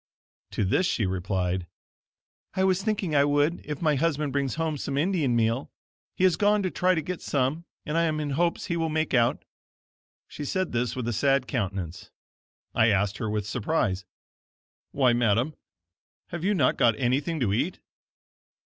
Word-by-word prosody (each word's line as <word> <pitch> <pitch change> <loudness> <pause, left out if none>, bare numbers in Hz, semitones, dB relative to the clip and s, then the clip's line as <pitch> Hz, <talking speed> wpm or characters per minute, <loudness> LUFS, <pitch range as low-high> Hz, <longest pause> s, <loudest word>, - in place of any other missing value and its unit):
To 105 - 0
this 175 - +2
she 110 - 0
replied: 90 -1 -1 0.9
"I 190 - +2
was 190 0 +2
thinking 200 -6 -1
I 140 -1 +5
would 145 +3 +2
if 150 +1 -5
my 155 -2 +3
husband 150 -2 0
brings 140 -2 0
home 160 -2 -2
some 140 +1 -3
Indian 155 -6 +1
meal. 115 +3 +1 0.5
He - - -1
has 185 -2 +4
gone 210 0 +3
to 185 - -1
try 185 0 +2
to 160 - -1
get 180 +2 -5
some 140 +5 -1 0.2
and 150 - -3
I 170 0 +3
am 155 -1 0
in 150 -2 -2
hopes 170 +4 0
he 170 - -2
will 165 -1 0
make 155 -1 -1
out." 120 -2 +2 0.8
She 150 - -7
said 185 +5 -1
this 120 0 -1
with 125 -2 -3
a 120 - 0
sad 135 +2 +2
countenance. 95 - -3 0.6
I 110 -1 +4
asked 100 -2 +1
her 110 - -2
with 105 -1 -1
surprise: 105 - -1 0.9
"Why 130 -3 +3
madam, 120 +4 +2 0.8
have 170 -1 -5
you 205 +2 +2
not 140 -8 +2
got 115 -3 +3
anything 140 +6 0
to 110 -7 +1
eat?" - - -1
140 Hz, 175 wpm, -26 LUFS, 115-165 Hz, 0.9 s, I